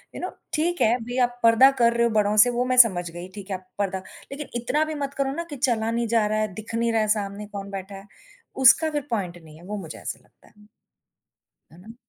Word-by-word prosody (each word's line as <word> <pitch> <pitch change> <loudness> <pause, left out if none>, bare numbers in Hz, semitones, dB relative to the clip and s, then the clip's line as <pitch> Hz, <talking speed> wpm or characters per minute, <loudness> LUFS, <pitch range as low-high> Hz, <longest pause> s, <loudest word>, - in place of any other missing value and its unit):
You - - -6
know 365 - -3 0.2
ठीक 345 +3 0
है, 225 +2 +4
भई 245 +2 -5
आप 245 0 -2
पर्दा 230 +4 +7
कर 235 0 +4
रहे 235 0 +1
हो - - -1
बढ़ो 210 0 +2
से 245 - 0
वो 245 +1 -1
मैं 255 0 0
समझ 185 -8 +5
गई 175 +2 -8
ठीक 200 -1 -9
है 195 - -2
आप 185 0 -11
पर्दा 190 -2 -1 0.3
लेकिन 285 +1 -6
इतना 270 +6 +1
भी 315 - -5
मत 280 0 -4
करो 275 -1 0
ना 335 +4 -3
कि 290 - -6
चला 235 -5 0
नहीं 235 0 -1
जा 225 -1 +2
रहा 215 +1 0
है, 215 -2 -2
दिख 220 +3 -7
नहीं 230 0 +1
रहा 225 -1 +2
है 215 - 0
सामने 205 0 -5
कौन 200 -1 -7
बैठा 195 0 -7
है, 195 0 -11 0.5
उसका 265 +5 +5
फिर 295 -1 -1
पॉइंट 185 -6 -3
नहीं 155 -1 -14
है। 170 - -16
वो 210 +2 -5
मुझे 165 -6 -8
ऐसा - - -6
लगता - - -27
है। 210 0 -22 1.0
है 165 - -17
ना? 225 +4 -13
225 Hz, 260 wpm, -24 LUFS, 200-250 Hz, 1.0 s, पर्दा